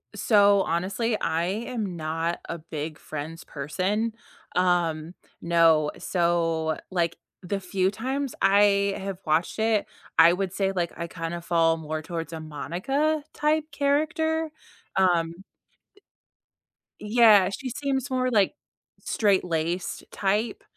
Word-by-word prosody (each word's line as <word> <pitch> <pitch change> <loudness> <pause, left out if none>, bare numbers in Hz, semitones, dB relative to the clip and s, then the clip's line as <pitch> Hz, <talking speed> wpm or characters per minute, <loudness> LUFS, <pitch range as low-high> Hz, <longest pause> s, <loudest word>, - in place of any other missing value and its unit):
So 200 -2 +5
honestly, 200 +7 -1
I 165 +2 0 0.2
am 215 -8 -3
not 165 +1 -2
a - - -4
big 155 -1 -6
Friends 155 +2 -7
person. 190 +10 -2 0.4
Um, 175 -2 +1 0.3
no. 165 -3 +4
So, 165 -3 0
like, 170 -2 0 0.2
the 195 +2 -3
few 185 0 0
times 265 +5 -3
I 200 0 +4
have 195 -1 -4
watched 160 +7 0
it, 220 -2 +2 0.3
I 170 +1 +8
would 190 0 -2
say, 195 -1 0
like, 175 -3 -2
I 170 0 -4
kinda 165 0 -5
fall 165 -1 +2
more 155 0 -4
towards 165 0 -5
a 160 - -5
Monica-type 290 - -1
character. 310 +3 0 0.4
Um 175 -1 +1 1.6
Yeah, 210 -3 +5
she 255 +6 -5
seems 270 +1 -2
more, 255 0 +1
like, 205 -5 +3 0.5
straight-laced 180 -4 0
type, 210 +3 -1
185 Hz, 115 wpm, -26 LUFS, 165-220 Hz, 1.6 s, I